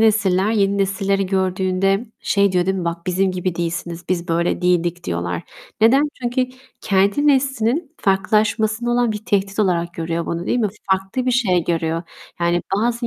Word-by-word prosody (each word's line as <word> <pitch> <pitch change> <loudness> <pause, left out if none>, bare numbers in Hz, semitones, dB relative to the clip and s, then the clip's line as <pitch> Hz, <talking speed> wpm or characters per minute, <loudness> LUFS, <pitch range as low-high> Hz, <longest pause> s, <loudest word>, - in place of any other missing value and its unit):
nesiller, 205 -3 +3
yeni 200 -2 +2
nesilleri 195 0 0
gördüğünde 190 +2 0
şey 200 -1 +2
diyor 180 -1 +1
değil 190 0 +1
mi? 180 - -3
Bak 170 +1 -4
bizim 190 +1 +1
gibi 180 -1 -2
değilsiniz, 170 0 -4
biz 175 -1 -1
böyle 170 +2 0
değildik 175 -1 +1
diyorlar. 85 0 -3 0.4
Neden? 240 +6 +5 0.2
Çünkü 250 +1 0 0.3
kendi 200 +8 +2
neslinin 270 +1 +1
farklılaşmasında 215 +4 +1
olan 240 -2 +2
bir 210 +1 -7
tehdit 195 0 0
olarak 175 -4 +1
görüyor 165 0 -3
bunu, 170 +1 -3
değil 245 - +1
mi? 215 -4 +1 0.2
Farklı 190 +7 0
bir - - +3
şey 195 -9 +2
görüyor, 165 -1 -1 0.4
yani 170 0 +1
bazı 235 +2 0
195 Hz, 160 wpm, -20 LUFS, 175-220 Hz, 0.4 s, Neden